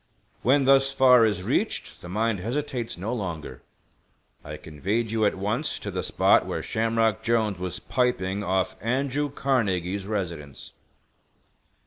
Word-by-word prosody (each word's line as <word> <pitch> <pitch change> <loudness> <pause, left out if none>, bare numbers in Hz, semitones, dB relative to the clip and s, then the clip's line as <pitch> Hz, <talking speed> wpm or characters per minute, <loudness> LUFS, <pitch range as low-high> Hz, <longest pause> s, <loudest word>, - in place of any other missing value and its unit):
When 135 +2 +3
thus 135 0 +5
far 125 -3 +6
is 90 -4 -2
reached - - -2
the 90 - -9
mind 110 +1 0
hesitates 120 +2 -3
no 105 +7 -3
longer. 90 -9 -5 0.8
I 75 +1 -7
conveyed 100 +11 -2
you 110 -1 +1
at - - -1
once 100 +4 -1
to - - -6
the - - -2
spot - - +3
where - - -3
Shamrock 115 -2 +1
Jolnes 110 -5 +1
was 90 0 -2
piping 105 -7 -1
off 95 -1 0
Andrew 135 +5 -1
Carnegie's 100 -9 -1
residence." 85 -10 -5
110 Hz, 135 wpm, -25 LUFS, 95-125 Hz, 0.8 s, far